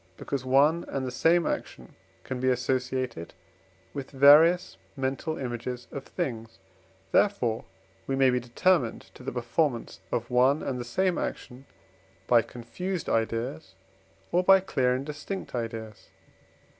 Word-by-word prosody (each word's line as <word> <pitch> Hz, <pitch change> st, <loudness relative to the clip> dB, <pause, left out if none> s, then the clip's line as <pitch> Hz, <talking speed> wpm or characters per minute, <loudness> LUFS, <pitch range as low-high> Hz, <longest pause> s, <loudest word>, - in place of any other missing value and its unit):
because 140 Hz, -2 st, -4 dB
one 145 Hz, +6 st, +3 dB
and 135 Hz, -1 st, -3 dB
the 125 Hz, -, -3 dB
same 165 Hz, +7 st, +3 dB
action -, -, -4 dB, 0.3 s
can 130 Hz, -1 st, -5 dB
be 130 Hz, +1 st, +1 dB
associated 125 Hz, -6 st, -2 dB, 0.6 s
with 140 Hz, -2 st, -6 dB
various 150 Hz, +6 st, +6 dB, 0.2 s
mental 135 Hz, +4 st, -2 dB
images 125 Hz, -1 st, -5 dB
of 140 Hz, -, -6 dB
things; 115 Hz, -, -5 dB, 0.5 s
therefore 125 Hz, -, +2 dB, 0.4 s
we 135 Hz, -, 0 dB
may 135 Hz, -1 st, +4 dB
be 125 Hz, -, +1 dB
determined 125 Hz, +2 st, 0 dB
to -, -, -14 dB
the -, -, -4 dB
performance 120 Hz, +1 st, -1 dB
of 115 Hz, +1 st, -2 dB
one 130 Hz, +4 st, +3 dB
and 130 Hz, -2 st, -3 dB
the -, -, -3 dB
same 180 Hz, +10 st, 0 dB
action 130 Hz, +2 st, -6 dB, 0.6 s
by 120 Hz, -1 st, +5 dB
confused 165 Hz, +12 st, -5 dB
ideas, 115 Hz, +2 st, -2 dB, 0.6 s
or 180 Hz, +1 st, +3 dB
by 195 Hz, +1 st, +7 dB
clear 130 Hz, -9 st, +1 dB
and 130 Hz, +2 st, -4 dB
distinct 150 Hz, +6 st, -6 dB
ideas. 115 Hz, -3 st, -6 dB
130 Hz, 135 wpm, -27 LUFS, 120-155 Hz, 0.6 s, by